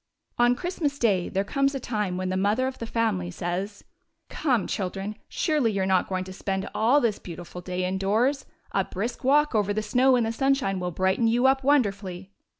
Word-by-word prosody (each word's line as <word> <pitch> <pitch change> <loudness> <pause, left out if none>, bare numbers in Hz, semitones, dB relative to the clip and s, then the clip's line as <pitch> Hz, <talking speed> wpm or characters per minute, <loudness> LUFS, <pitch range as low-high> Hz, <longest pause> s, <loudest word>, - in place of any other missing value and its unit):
On 240 +1 +5
Christmas 325 -3 -2
day 200 -9 +1
there 195 - 0
comes 275 +6 0
a - - -2
time 210 -7 -2
when 185 0 -2
the 185 - -1
mother 205 +7 +1
of 260 0 -4
the 230 - -5
family 220 -7 0
says: 180 +4 -4 0.2
" - - -51
Come, 250 - 0
children, 195 +2 -3
surely 300 -9 +1
you 195 -1 0
're - - +1
not 190 -1 +2
going 185 -1 -1
to 185 0 -9
spend 190 0 -3
all 240 +7 +4
this 230 -6 0
beautiful 175 0 -9
day 180 0 -3
indoors. 210 +9 0 0.2
A 195 - +1
brisk 205 +7 -5
walk 295 +2 +3
over 205 -2 +1
the 215 - -1
snow 255 +5 +4
in 245 - +2
the 225 - -1
sunshine 270 -6 +1
will 180 0 -2
brighten 190 +6 +1
you 240 +3 +2
up 265 0 +4
wonderfully." 200 -9 0
210 Hz, 205 wpm, -26 LUFS, 190-255 Hz, 0.2 s, On